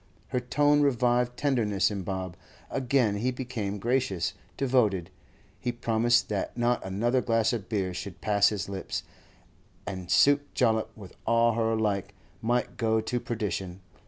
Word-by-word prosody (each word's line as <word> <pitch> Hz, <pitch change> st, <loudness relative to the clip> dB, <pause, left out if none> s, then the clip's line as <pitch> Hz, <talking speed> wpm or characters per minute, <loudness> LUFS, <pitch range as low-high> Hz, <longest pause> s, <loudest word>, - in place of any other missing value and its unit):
Her 125 Hz, -, 0 dB
tone 145 Hz, +4 st, +3 dB
revived 125 Hz, -2 st, +2 dB
tenderness 110 Hz, -, +1 dB
in 100 Hz, -2 st, -3 dB
Bob; 95 Hz, -2 st, -4 dB, 0.4 s
again 125 Hz, -5 st, +1 dB
he 120 Hz, +5 st, 0 dB
became 120 Hz, -6 st, -4 dB
gracious, 100 Hz, -6 st, 0 dB, 0.2 s
devoted; 110 Hz, -10 st, +1 dB, 0.5 s
he 120 Hz, -, -1 dB
promised 120 Hz, 0 st, +2 dB
that 105 Hz, +2 st, -3 dB
not 120 Hz, 0 st, +1 dB
another 115 Hz, +7 st, +1 dB
glass 115 Hz, -1 st, +2 dB
of 105 Hz, -6 st, -4 dB
beer 95 Hz, -4 st, -1 dB
should 90 Hz, +1 st, -7 dB
pass 100 Hz, -1 st, +3 dB
his 105 Hz, -3 st, -3 dB
lips, 95 Hz, -1 st, -4 dB, 0.8 s
and 95 Hz, -3 st, -6 dB
Sake 145 Hz, +9 st, +4 dB
Jollop, 110 Hz, -3 st, +2 dB
with 100 Hz, -4 st, -11 dB
all 115 Hz, 0 st, +4 dB
her 115 Hz, 0 st, +1 dB
like, 105 Hz, -3 st, -1 dB, 0.3 s
might 120 Hz, +2 st, 0 dB
go 110 Hz, -2 st, +2 dB
to 120 Hz, +3 st, -2 dB
perdition. 100 Hz, -6 st, -4 dB
115 Hz, 145 wpm, -28 LUFS, 100-125 Hz, 0.8 s, Sake